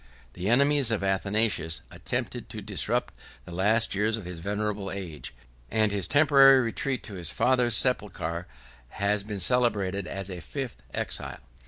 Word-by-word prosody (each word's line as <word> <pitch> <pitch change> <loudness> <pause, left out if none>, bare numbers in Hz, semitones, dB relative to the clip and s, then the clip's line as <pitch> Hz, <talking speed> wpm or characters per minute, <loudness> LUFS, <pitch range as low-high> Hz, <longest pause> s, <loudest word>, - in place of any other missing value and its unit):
The 90 +3 -3
enemies 140 +1 +3
of 110 -4 -1
Athanasius 95 -4 +1
attempted - - -4
to - - -7
disturb - - 0 0.3
the - - -10
last 105 +6 +2
years 105 +3 +1
of 105 - -8
his 90 -2 -7
venerable 105 +2 -3
age; 80 -9 -7 0.4
and 110 -1 +1
his 100 -4 -1
temporary 140 - +6
retreat 130 +2 -2
to 105 - -9
his 85 -4 -5
father's 125 +1 +3
sepulchre 90 -8 0 0.4
has 100 +5 0
been 105 0 -6
celebrated 100 -4 +1
as 95 0 -6
a 90 -2 -6
fifth 75 -5 -6
exile. - - -3
105 Hz, 150 wpm, -27 LUFS, 95-120 Hz, 0.4 s, temporary